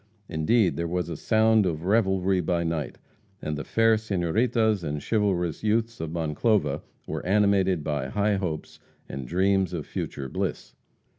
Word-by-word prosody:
Indeed, 90 +6 +2
"there 85 - -1
was 90 0 -2
a 85 - -4
sound 110 +3 +3
of 80 -2 -3
revelry 95 -2 +2
by 85 0 0
night," 80 -6 -3 0.4
and 75 - -3
the 75 - -4
fair 115 -1 +3
senoritas 110 +2 +1
and 75 -1 -2
chivalrous 95 -3 0
youths 115 +2 0
of 80 - -3
Monclova 80 -1 0 0.2
were - - -4
animated 95 -3 +2
by 75 -3 -2
high 100 +7 +1
hopes 85 -5 -4 0.3
and 65 -2 -6
dreams 95 +1 +1
of 80 -4 -4
future 70 -1 -5
bliss. - - -4
90 Hz, 150 wpm, -26 LUFS, 80-105 Hz, 0.4 s, sound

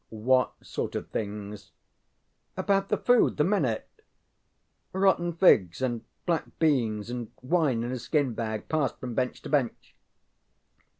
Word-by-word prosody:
ŌĆØ 110 -1 -9
ŌĆ£What 130 0 +4
sort - - -4
of - - -3
things? 105 -1 -5 0.8
ŌĆØ - - -3
ŌĆ£About 195 0 +2
the - - +1
food 245 -1 +3
the 150 - +4
men 195 -3 +2
ate; 115 -3 -1 1.1
rotten 190 -2 +2
figs 105 - +4
and 120 -3 -1 0.2
black 170 -3 0
beans 120 -8 +1
and 120 -3 -5
wine 135 -5 +1
in 120 - -3
a 130 - -3
skin 140 0 0
bag, 110 -1 -4
passed 155 -4 0
from 125 -2 -5
bench 125 +1 -2
to - - -7
bench. 135 -6 -1
130 Hz, 155 wpm, -28 LUFS, 110-160 Hz, 1.1 s, ŌĆ£What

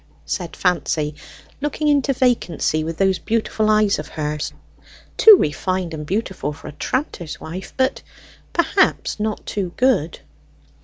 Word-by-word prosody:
said 175 -3 -4
Fancy, 160 -4 0 0.5
looking 295 +1 -1
into 285 -2 +3
vacancy 230 - +1
with 160 0 -4
those 190 -1 +2
beautiful 220 -1 0
eyes 215 -3 +3
of 150 - -6
hers 150 -1 -3 0.6
too 435 -2 +9
refined 180 - -1
and 150 -1 -6
beautiful 190 -6 -2
for 160 - -12
a - - -6
tranter's 175 - -3
wife; 180 +4 -7
but, 260 +1 +1 0.5
perhaps, 340 - +1
not 215 0 -2
too 190 -4 -3
good. 250 - +2
190 Hz, 135 wpm, -21 LUFS, 160-255 Hz, 0.6 s, too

